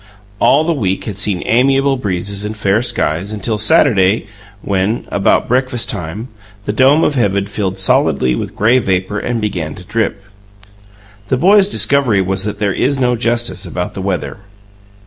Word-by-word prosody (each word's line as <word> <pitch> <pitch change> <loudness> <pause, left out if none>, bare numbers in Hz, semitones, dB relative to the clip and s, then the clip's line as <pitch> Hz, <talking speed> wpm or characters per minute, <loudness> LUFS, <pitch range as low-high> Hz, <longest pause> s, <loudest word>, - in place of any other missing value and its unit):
All 145 +3 +4
the 170 +1 0
week 95 - -2
had 100 -2 -6
seen 100 -3 -1
amiable 135 +3 +2
breezes 100 -3 -3
and 105 +1 -5
fair 105 +1 +1
skies 95 -5 -2
until 110 0 -2
Saturday, 105 -1 +3 0.4
when, 100 +3 -1
about 100 - +1
breakfast 125 -1 0
time, 95 +9 -6 0.4
the 105 - -2
dome 135 +7 +4
of 150 - +1
heaven 100 -6 0
filled 100 -2 -3
solidly 65 -8 +2
with - - -5
gray 115 +5 +3
vapour 95 -1 -1
and 120 +1 -2
began 90 -8 -3
to 90 - -11
drip. 105 -1 -2 1.0
The 130 - 0
boys' 195 +6 +4
discovery 135 - +2
was 95 +1 0
that 105 -1 -4
there 100 -2 -1
is 135 +7 0
no 125 -2 +1
justice 120 0 -1
about 90 -1 -4
the 95 - -6
weather. 95 +1 -3
105 Hz, 165 wpm, -15 LUFS, 95-125 Hz, 1.0 s, All